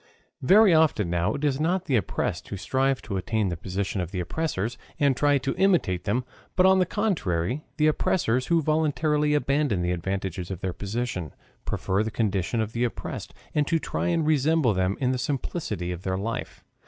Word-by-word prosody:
Very 195 +6 +6
often 150 - +3
now 85 +5 +1
it 145 - -5
is 140 -2 +1
not 180 +4 0
the 140 - +1
oppressed 90 -4 -1
who 100 - -5
strive 135 +6 0
to 100 -6 -3
attain 105 +2 0
the 85 - -2
position 95 +3 -3
of 90 - -4
the 90 - -4
oppressors, 115 - -2 0.2
and 140 -2 +3
try 145 +1 +3
to 135 0 -2
imitate 175 - +2
them, 120 +5 0 0.3
but 185 - +4
on 190 0 +6
the 180 - +2
contrary 140 - -1
the 150 - +3
oppressors 130 -5 +1
who 165 -2 +2
voluntarily 150 -1 +1
abandon 140 -9 +1
the 90 - 0
advantages 90 0 -3
of 95 -3 -5
their 95 -2 -2
position, 100 - -4 0.3
prefer 95 +2 0
the 110 - -1
condition 105 0 0
of 110 0 -3
the 120 - 0
oppressed, 120 - -4 0.2
and 150 -1 +1
try 165 +1 0
to 165 - +1
resemble 155 -4 +3
them 95 +1 0
in 130 -2 +1
the 130 - -1
simplicity 125 - -3
of 90 -1 -5
their 95 0 -2
life. 115 +4 -4
125 Hz, 190 wpm, -26 LUFS, 95-150 Hz, 0.3 s, Very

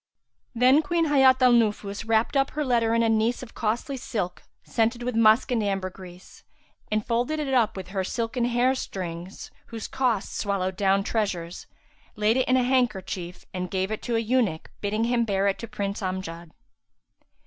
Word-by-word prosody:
Then 255 +5 +5
Queen 330 +2 0
Hayat 265 -2 +5
al 250 - +7
Nufus 210 -2 0
wrapped 225 +4 +2
up 275 0 +3
her 300 - 0
letter 230 -3 +2
in 230 - +3
a - - +3
niece 225 +3 +1
of 240 - -11
costly 235 +5 -2
silk 200 -8 -4 0.2
scented 235 +1 0
with 250 -1 -2
musk 225 +2 +4
and 235 -3 +1
ambergris; 185 -2 -5 0.5
and 215 0 0
folded 245 +7 0
it 280 -3 -2
up 230 -6 +2
with 185 -1 -7
her 190 -1 -2
silken 235 +4 -2
hair 245 +1 +2
strings[FN#358] 185 -7 -6 0.2
whose 225 -2 -6
cost 245 -6 -1
swallowed 190 -2 -1
down 195 0 +2
treasures 185 -6 -3 0.5
laid 215 +1 +2
it 260 - +1
in 255 - +4
a 255 - +3
handkerchief 195 -8 -1
and 180 -1 -3
gave 190 +1 -1
it 215 - -3
to 235 - -2
a - - +3
eunuch 225 -8 0
bidding 215 +2 -1
him 235 0 +2
bear 200 -3 +1
it 195 - 0
to 230 - -6
Prince 200 -3 -4
Amjad. 185 -3 -5
220 Hz, 180 wpm, -25 LUFS, 195-245 Hz, 0.5 s, al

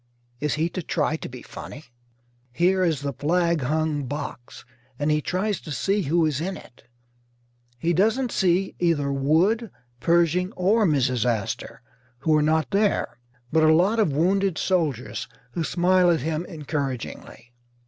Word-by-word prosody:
Is 150 +1 0
he 160 +2 +1
to 185 - -4
try 155 -2 0
to - - -7
be 125 0 -10
funny? 150 - -9 0.7
Here 185 +7 +2
is 160 -6 +1
the 140 -1 -3
flag 170 +3 +1
hung 150 +1 -1
box, 145 -3 -7 0.3
and 145 +2 0
he 150 0 +2
tries 190 +5 -1
to 155 - -9
see 200 +7 0
who 165 +1 +2
is 150 -2 -1
in 190 +3 -3
it. 120 - -16 0.9
He 165 +7 0
doesn't 225 +8 +2
see 185 +1 +1
either 155 -5 +1
Wood, 170 - +2 0.3
Pershing, 175 - +2
or 205 +4 +2
Mrs. 130 -6 +1
Astor, 115 -5 -3 0.4
who 155 +1 +3
are 150 - +4
not 155 +3 +1
there; 200 - 0 0.3
but 160 - +3
a 155 0 +5
lot 195 +7 +3
of 200 -8 +3
wounded 185 +5 +1
soldiers, 155 - -1 0.2
who 170 - -2
smile 180 +2 +3
at 165 -4 +2
him 160 +4 -2
encouragingly. 135 - -5
160 Hz, 155 wpm, -24 LUFS, 145-185 Hz, 0.9 s, a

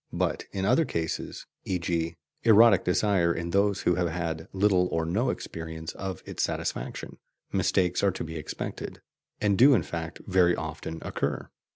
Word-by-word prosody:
But - - -1
in 95 -1 -2
other 125 +10 +4
cases 80 - -3 0.2
e.g. 85 -2 -1 0.3
erotic 115 -2 +6
desire 90 -2 +2
in 85 0 -3
those 100 +1 +2
who 90 - +3
have 90 -1 0
had 80 -1 -3
little 95 -2 +3
or 80 -2 -1
no 105 +10 +1
experience 80 -1 -5
of 95 -3 -5
its - - -4
satisfaction - - -3 0.3
mistakes 90 -1 +1
are 100 - +4
to - - -4
be 80 0 -7
expected, 75 - -6 0.4
and 100 -2 +2
do 135 +2 +8
in 95 - +2
fact 80 +2 -5
very 90 -2 +4
often 80 0 -5
occur. - - -3
90 Hz, 160 wpm, -27 LUFS, 80-100 Hz, 0.4 s, do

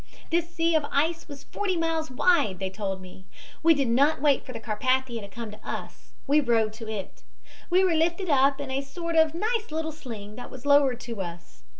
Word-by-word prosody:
This 335 0 +1
sea 335 0 +1
of 315 -2 +3
ice 320 +4 0
was 285 -2 -10
forty 390 -3 -2
miles 325 -2 -1
wide, 255 - +2
they 190 0 -3
told 195 -1 -4
me. 185 0 -13 0.4
We 330 0 +6
did 275 -3 +1
not 275 +6 +3
wait 285 -1 +3
for - - -9
the 230 - -6
Carpathia 240 +2 0
to 200 - -8
come 225 +2 -7
to 210 - -12
us, - - -7
we 290 +2 +4
rowed 225 -4 +2
to 225 - -6
it. 205 -3 -6 0.5
We 365 +2 +4
were 365 -3 +3
lifted 340 +4 +1
up 275 -2 +3
in 280 -2 -5
a 270 +1 0
sort 335 +4 -5
of 320 -1 +4
nice 445 +4 -1
little 320 +1 -2
sling 225 -9 -9
that 245 - -8
was 260 0 -11
lowered 285 -4 +4
to 230 -4 -5
us. 170 - -8
275 Hz, 215 wpm, -26 LUFS, 225-325 Hz, 0.5 s, We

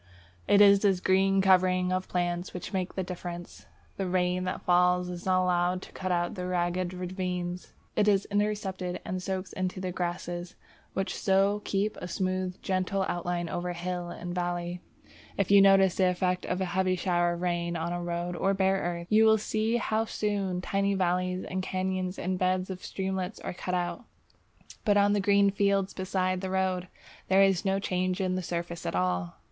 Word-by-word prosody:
It 205 - +6
is 200 -1 +8
this 195 -3 +2
green 195 +1 +3
covering 185 -1 +4
of 185 0 -1
plants 175 0 -2
which 180 - -6
makes 185 -1 -2
the 190 - -1
difference. 175 -1 -7 0.3
The 195 - -2
rain 180 0 0
that 185 - -4
falls 180 0 +3
is 175 +1 -6
not 185 0 +3
allowed 180 0 +1
to - - -12
cut 185 -1 -4
out 175 +2 0
ragged 180 -1 -1
ravines; 180 -1 -4 0.2
it 210 - +2
is 200 -1 +3
intercepted 200 -3 -1
and 185 0 -3
soaks 190 0 -4
into 185 0 -3
the 185 -1 -3
grasses, 175 0 -4 0.4
which 195 0 -2
so 195 +1 +2
keep 205 +2 -1
a 180 - -6
smooth, 185 +1 -2
gentle 190 +1 0
outline 175 0 -2
over 175 +1 -3
hill 175 0 -4
and 175 0 -6
valley. 175 0 -3 0.6
If 200 -1 0
you 200 -1 +8
notice 195 -2 +6
the 185 -1 +3
effect 180 0 -1
of 180 +1 -1
a - - +1
heavy 185 0 +2
shower 175 -1 +1
of 170 - -6
rain 175 -1 -1
on 170 +1 -2
a 175 - -3
road 175 0 -3
or 195 +3 +1
bare 190 0 +2
earth, 170 0 -3
you 215 +1 +6
will 220 0 +6
see 220 +2 0
how 220 -1 0
soon 200 -5 -2
tiny 200 +1 0
valleys 180 0 0
and 185 0 -3
cañons 185 0 -2
and 185 0 -2
beds 185 +1 0
of 185 -1 -7
streamlets 190 0 -3
are - - -4
cut 180 +1 -3
out. 175 +4 -3 0.8
But 205 -1 +3
on 205 0 +4
the 205 - +2
green 200 0 +4
fields 200 -1 +1
beside 185 -1 -1
the 190 - -3
road, 185 -1 0 0.4
there 190 +1 +5
is 195 -2 +3
no 195 0 +2
change 185 -1 -1
in 185 -1 0
the 185 - -1
surface 170 -1 -4
at - - -2
all! 90 -1 -1
185 Hz, 185 wpm, -28 LUFS, 175-195 Hz, 0.8 s, is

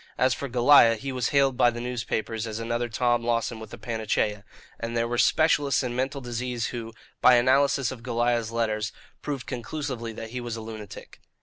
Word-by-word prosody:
As 130 0 +3
for 140 - -5
Goliah, 120 -1 +6
he 135 +5 -5
was 125 -2 -1
hailed 140 -2 +3
by 120 - +5
the 120 0 -5
newspapers 115 -2 -3
as 110 -1 -4
another 120 +1 -2
Tom 120 0 +1
Lawson 115 -1 -1
with 110 - -10
a 120 - -8
panacea; 110 -3 -1 0.4
and 115 0 -3
there 115 0 +1
were 120 0 -2
specialists 145 -4 +3
in 120 -1 -3
mental 135 +2 -2
disease 120 -1 -3
who, 115 -2 -5 0.3
by 125 - +7
analysis 135 +1 +3
of 130 -3 -8
Goliah's 120 -1 0
letters, 110 -1 -1 0.3
proved 140 -4 -4
conclusively 125 -2 -4
that 110 0 -8
he 125 0 -4
was 120 -2 -4
a 115 - -6
lunatic. 110 -2 -10
120 Hz, 190 wpm, -26 LUFS, 115-130 Hz, 0.4 s, by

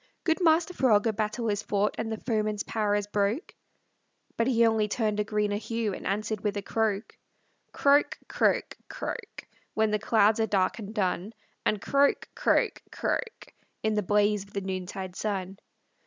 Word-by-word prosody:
"Good 325 +1 +1
Master 330 +1 +3
Frog, 225 -9 +3
a 225 - +2
battle 215 +2 -2
is 205 0 -1
fought, 205 0 0
And 225 0 -3
the 220 - -2
foeman's 215 -3 -1
power 210 -2 0
is 205 -1 0
broke." 205 - -1 0.8
But 230 - +1
he 235 -3 +4
only 220 -2 +2
turned 210 -1 -1
a - - +3
greener 210 -1 0
hue, 225 -1 -2
And - - -6
answered 210 +1 -1
with 210 -1 -1
a 200 - -3
croak. 220 -1 -1 0.6
Croak, 285 +1 +3
croak, - - +1
croak, - - -6 0.3
When 220 -1 +2
the 210 - +1
clouds 215 0 +3
are 220 - +2
dark 195 +1 +1
and 205 -1 -6
dun, 195 -1 -1 0.3
And 215 - +1
croak, 280 0 +2
croak, - - +1
croak, 470 -2 -3 0.3
In 220 0 +1
the 210 - +1
blaze 205 +1 +2
of 200 - -20
the 200 - -2
noontide 185 -1 -5
sun. 195 -2 -3
210 Hz, 170 wpm, -28 LUFS, 205-225 Hz, 0.8 s, he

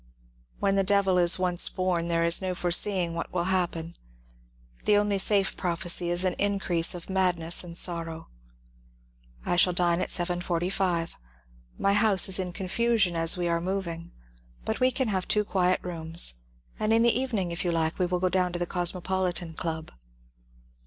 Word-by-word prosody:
When 195 0 +1
the 195 - +3
Devil 195 -2 +2
is 175 0 +4
once 180 -1 +1
born 180 -2 -1
there 165 -1 +1
is 170 +2 +3
no 185 -1 -2
foreseeing 180 0 +1
what 170 - -5
will 175 -1 -1
happen. 170 -2 -2 0.9
The 205 - +4
only 205 -1 +1
safe 195 0 +1
prophecy 175 -1 -2
is 175 +1 +1
an 185 - +1
increase 195 -5 +1
of 175 - -9
madness 180 -3 +1
and 170 -1 -7
sorrow. 165 -2 -1 1.2
^* - - -11
I 175 - +2
shall 180 0 +4
dine 175 0 +1
at - - -2
7.45. 175 0 -1 0.6
My 200 - +2
house 205 -2 +4
is 190 0 +3
in 180 -1 -3
confusion, 200 0 0
as 165 +1 +2
we 175 -1 -1
are 170 0 0
moving, 170 -2 -4 0.5
but - - -2
we 255 - +4
can 260 -2 -1
have 190 -3 -2
two 210 0 +1
quiet 185 -2 +1
rooms, 165 - +1 0.5
and 215 - 0
in 225 +1 +4
the 235 - +3
even 255 -4 -2
ing, 180 -3 -2
if 170 - -4
you 175 - 0
like, 160 0 -1
we 180 - +2
will 180 0 -1
go 185 0 +1
down 180 0 0
to - - -2
the 175 - -1
Cosmopolitan 180 -1 -1
Club." 160 -1 -5
180 Hz, 180 wpm, -27 LUFS, 170-190 Hz, 1.2 s, is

